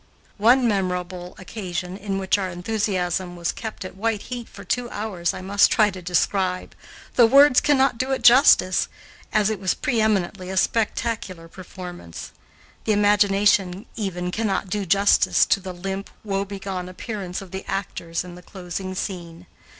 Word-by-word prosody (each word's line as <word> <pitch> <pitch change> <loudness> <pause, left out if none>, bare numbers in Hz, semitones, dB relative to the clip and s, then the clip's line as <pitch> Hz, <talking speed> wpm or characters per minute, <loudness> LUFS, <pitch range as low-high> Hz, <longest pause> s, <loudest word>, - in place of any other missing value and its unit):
One 245 +4 +5
memorable 180 -3 -2
occasion 185 -2 -5
in 195 -1 -3
which 195 +1 +1
our 190 -1 -2
enthusiasm 180 -1 -2
was 170 0 -1
kept 220 -4 -7
at 185 - -8
white 215 +1 -1
heat 245 -2 -7
for 200 - -11
two 240 +6 -2
hours 205 -6 -2
I - - -7
must 200 +2 +4
try 215 -3 +3
to 185 0 -9
describe, 180 +1 0 0.4
though 240 -2 +8
words 275 +1 +6
cannot 270 -4 +2
do 260 - -1
it 265 - -1
justice, 235 -7 +6 0.4
as 215 0 +2
it 215 - -3
was 190 -1 0
pre 235 -3 0
eminently 195 -3 0
a 190 - -4
spectacular 210 -5 -1
performance. 180 - -9 0.5
The 215 - +2
imagination 205 -2 +3
even 180 -4 -3
cannot 200 -3 -1
do 205 -2 -2
justice 200 +3 +4
to - - +2
the 185 -1 -7
limp, 195 +2 -5
woe 195 -2 -1
begone 190 -2 -5
appearance 185 -1 -5
of 195 -2 -11
the 190 0 -5
actors 175 -4 -3
in 180 -1 -10
the 180 - -11
closing 185 +1 -6
scene. 175 -2 -6
195 Hz, 160 wpm, -23 LUFS, 180-215 Hz, 0.5 s, though